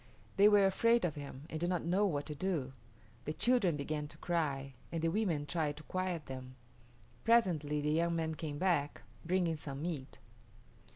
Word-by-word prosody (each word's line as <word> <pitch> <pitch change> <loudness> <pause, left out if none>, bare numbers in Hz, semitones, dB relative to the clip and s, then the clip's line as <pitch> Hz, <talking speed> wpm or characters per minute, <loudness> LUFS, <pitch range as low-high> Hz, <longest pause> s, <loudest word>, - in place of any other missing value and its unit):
They 205 +1 +7
were 205 -1 +6
afraid 230 +3 +3
of 165 - -1
him 140 -2 -8
and 155 - -3
did 175 +2 0
not 180 -3 -1
know 190 +4 +3
what 145 -5 -1
to 150 - -5
do. 150 -5 -2 0.5
The 150 - -2
children 215 -7 +2
began 150 +1 -3
to 150 - -13
cry, 145 -6 -1 0.2
and 165 - -2
the 165 - +3
women 170 -6 0
tried 150 -2 -1
to 155 - -10
quiet 185 -3 -2
them. 130 -1 -8 0.7
Presently 170 -11 +3
the 150 +1 0
young 170 +2 +2
man 160 -1 -1
came 150 -2 -5
back, 165 -5 0 0.2
bringing 170 -2 +1
some 140 -1 -6
meat. 155 -6 -4
160 Hz, 180 wpm, -34 LUFS, 145-185 Hz, 0.7 s, They